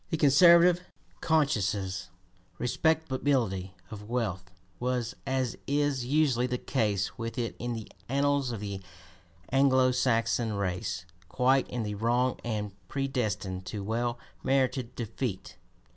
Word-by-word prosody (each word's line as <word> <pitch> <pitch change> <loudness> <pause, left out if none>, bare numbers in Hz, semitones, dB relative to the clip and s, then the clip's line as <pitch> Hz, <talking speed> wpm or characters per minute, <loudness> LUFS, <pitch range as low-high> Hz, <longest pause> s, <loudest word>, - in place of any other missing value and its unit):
The 160 - 0
conservative, 170 +4 +6 0.4
conscienceless 100 - +1 0.5
respectability 130 - 0 0.2
of 105 0 -8
wealth 100 -7 -2 0.3
was, 125 -1 -1
as 130 -2 0
is 140 -3 +1
usually 135 -4 +2
the 125 0 -1
case 105 -4 -1
with 115 +3 -4
it 120 -2 -2
in 120 0 -2
the 110 -2 -6 0.2
annals 140 -1 +1
of 110 -3 -5
the 100 -2 -4 0.7
Anglo 130 -1 +4
Saxon 115 -2 +1
race, 95 -2 -2 0.2
quite 130 +7 +2
in 120 -2 -2
the 105 -1 -3
wrong 120 +4 +1
and 105 -3 -2 0.2
predestined 105 -9 -2
to 105 -2 -4
well 120 +3 -1 0.3
merited 130 -2 +1
defeat. 115 -2 -4
120 Hz, 120 wpm, -29 LUFS, 105-135 Hz, 0.7 s, conservative